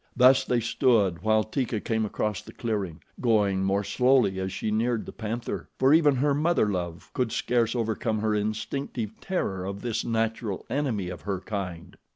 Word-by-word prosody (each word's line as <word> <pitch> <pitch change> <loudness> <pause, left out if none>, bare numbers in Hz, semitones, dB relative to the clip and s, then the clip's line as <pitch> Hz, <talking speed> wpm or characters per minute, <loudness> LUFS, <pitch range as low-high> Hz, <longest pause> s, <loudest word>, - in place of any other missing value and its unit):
Thus 130 +1 +6
they 125 - +2
stood 110 - +2
while 110 +1 +3
Teeka 115 0 -2
came 110 +1 -1
across 105 0 -2
the - - -13
clearing, 100 -8 -3 0.2
going 105 -5 +2
more 100 +1 +1
slowly 120 -2 +3
as 95 0 -2
she 110 - -2
neared 115 +1 0
the - - -7
panther, 115 +1 -4
for 130 +2 +5
even 150 -3 +5
her 140 +3 +2
mother 155 -4 +2
love 85 -3 -4
could 125 -3 0
scarce 120 -1 +1
overcome 110 -1 -1
her 110 0 +1
instinctive 110 +2 -3
terror 95 - -2
of 100 +1 -5
this 115 -2 -1
natural 115 -3 -1
enemy 120 -9 -1
of 90 - -7
her 100 -2 -2
kind. 95 -2 -6
110 Hz, 175 wpm, -27 LUFS, 100-125 Hz, 0.2 s, Thus